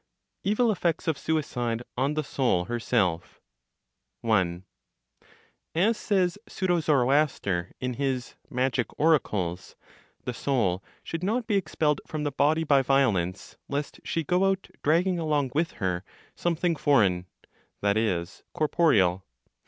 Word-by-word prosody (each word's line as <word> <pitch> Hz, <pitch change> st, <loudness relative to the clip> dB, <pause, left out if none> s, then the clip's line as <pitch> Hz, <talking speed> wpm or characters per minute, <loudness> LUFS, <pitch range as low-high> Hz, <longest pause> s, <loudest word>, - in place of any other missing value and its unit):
EVIL 220 Hz, +3 st, +2 dB
EFFECTS 175 Hz, -3 st, -1 dB
OF 160 Hz, -, +2 dB
SUICIDE 125 Hz, -7 st, -2 dB
ON 135 Hz, +4 st, 0 dB
THE 155 Hz, -, 0 dB
SOUL 125 Hz, -11 st, +1 dB
HERSELF. 105 Hz, -7 st, -1 dB, 0.8 s
1. 95 Hz, -6 st, +1 dB, 1.1 s
(As 205 Hz, +8 st, +3 dB
says 190 Hz, -2 st, 0 dB
pseudo 180 Hz, -3 st, 0 dB
Zoroaster, 135 Hz, -, +1 dB
in 125 Hz, 0 st, -2 dB
his 130 Hz, -1 st, -2 dB, 0.2 s
Magic 125 Hz, -1 st, 0 dB
Oracles), 100 Hz, -, +1 dB, 0.5 s
"The 125 Hz, -, -3 dB
soul 110 Hz, -9 st, 0 dB, 0.2 s
should 165 Hz, +1 st, -5 dB
not 225 Hz, +5 st, 0 dB
be 220 Hz, -, -1 dB
expelled 155 Hz, -5 st, +1 dB
from 155 Hz, -1 st, -3 dB
the 145 Hz, -, -1 dB
body 150 Hz, +4 st, +2 dB
by 140 Hz, -3 st, +4 dB
violence, 110 Hz, -10 st, +1 dB
lest 145 Hz, +1 st, -3 dB
she 165 Hz, -, -1 dB
go 180 Hz, +5 st, +2 dB
out 195 Hz, 0 st, 0 dB
(dragging 175 Hz, +4 st, +2 dB
along 150 Hz, -5 st, 0 dB
with 160 Hz, +3 st, 0 dB
her 90 Hz, -1 st, -2 dB, 0.3 s
something 175 Hz, 0 st, 0 dB
foreign," 100 Hz, -, +2 dB, 0.5 s
that 100 Hz, 0 st, +2 dB
is, 95 Hz, -5 st, -1 dB
corporeal). 105 Hz, -, +3 dB
140 Hz, 125 wpm, -27 LUFS, 105-165 Hz, 1.1 s, by